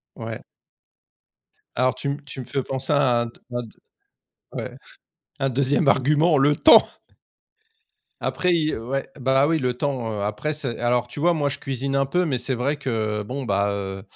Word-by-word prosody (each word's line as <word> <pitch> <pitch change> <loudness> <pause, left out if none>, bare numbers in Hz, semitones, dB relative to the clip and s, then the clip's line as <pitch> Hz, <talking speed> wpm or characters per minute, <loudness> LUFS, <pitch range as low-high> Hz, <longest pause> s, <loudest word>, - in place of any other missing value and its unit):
Ouais. 115 -1 -6 1.3
Alors 130 0 +2
tu 135 +2 -5
me 140 +1 -4
tu 135 -1 -8
me - - -6
fais 135 +2 -2
penser 130 +2 -3
à 130 -5 +3
un - - -3
de 115 - -10 0.2
à 120 0 -2
de 115 - -11 0.8
ouais, - - -6 0.6
un 135 - +1
2e 140 +3 +1
argument, 150 +5 +3
le 145 +2 +4
temps! 315 - +8 1.4
Après 180 -1 +1
i 155 -2 +1
ouais, 130 +5 -3
bah, 135 +2 +3
oui, 165 0 +2
le 125 -3 -1
temps, 125 -5 -2
heu, 105 -1 -3
après, 105 +9 -2
c'est 135 -6 -5
alors 120 0 +1
tu 120 - -9
vois, 175 +2 +3
moi, 145 -3 0
je 140 +1 -5
cuisine 135 0 -3
un 135 0 +2
peu 180 +7 +1
mais 140 -7 -1
c'est 125 +2 -2
vrai 130 +5 -1
que, 110 -6 -2
bon, 130 +6 -5
bah, 100 -2 +1
heu, 95 -1 -5
130 Hz, 185 wpm, -23 LUFS, 120-145 Hz, 1.4 s, temps